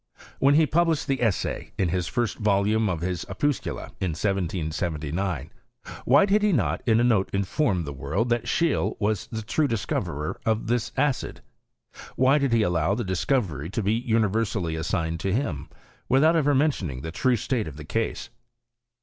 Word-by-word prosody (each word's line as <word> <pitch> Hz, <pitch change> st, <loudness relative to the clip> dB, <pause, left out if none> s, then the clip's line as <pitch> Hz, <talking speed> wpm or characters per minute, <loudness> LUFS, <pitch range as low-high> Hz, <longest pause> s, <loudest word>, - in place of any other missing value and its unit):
When 140 Hz, +1 st, +4 dB
he 160 Hz, +1 st, +5 dB
published 165 Hz, 0 st, +1 dB
the 135 Hz, -2 st, -1 dB
essay 110 Hz, -6 st, -1 dB
in 90 Hz, -4 st, +1 dB
the 90 Hz, 0 st, +1 dB
first 120 Hz, +6 st, -2 dB
volume 105 Hz, +1 st, +2 dB
of 85 Hz, -3 st, -2 dB
his 90 Hz, -1 st, -2 dB
Opuscula, 135 Hz, +6 st, -2 dB
in 90 Hz, -4 st, -1 dB
1779, 85 Hz, -3 st, -2 dB, 0.5 s
why 140 Hz, +8 st, +6 dB
did 205 Hz, +1 st, +3 dB
he 210 Hz, 0 st, +3 dB
not 130 Hz, -, 0 dB
in 110 Hz, -1 st, +4 dB
anoteinforrathe 100 Hz, -, +1 dB
world 80 Hz, -, -1 dB
that 120 Hz, -1 st, 0 dB
Scheele 165 Hz, -4 st, +1 dB
was 105 Hz, -2 st, -1 dB
the 110 Hz, -2 st, -5 dB
true 145 Hz, +7 st, +1 dB
discoverer 75 Hz, -, -3 dB
of 110 Hz, 0 st, 0 dB
this 120 Hz, 0 st, -1 dB
acid? 145 Hz, -3 st, -1 dB, 0.7 s
Why 135 Hz, +3 st, +4 dB
did 140 Hz, -3 st, 0 dB
he 115 Hz, -2 st, +3 dB
allow 90 Hz, 0 st, +1 dB
the 120 Hz, -, -2 dB
discovery 95 Hz, -, -1 dB
to 110 Hz, +3 st, -2 dB
be 100 Hz, +3 st, +2 dB
universally 110 Hz, -6 st, 0 dB
assigned 80 Hz, 0 st, -2 dB
to 95 Hz, +2 st, -1 dB
him, 110 Hz, -, -2 dB, 0.4 s
without 155 Hz, +6 st, +4 dB
ever 145 Hz, -3 st, +3 dB
mentioning 105 Hz, -, 0 dB
the 80 Hz, -, -5 dB
true 125 Hz, +8 st, +2 dB
state 120 Hz, -, -1 dB
of 75 Hz, -2 st, -8 dB
the 75 Hz, -, -8 dB
case? 115 Hz, +7 st, -3 dB
105 Hz, 160 wpm, -25 LUFS, 85-130 Hz, 0.7 s, why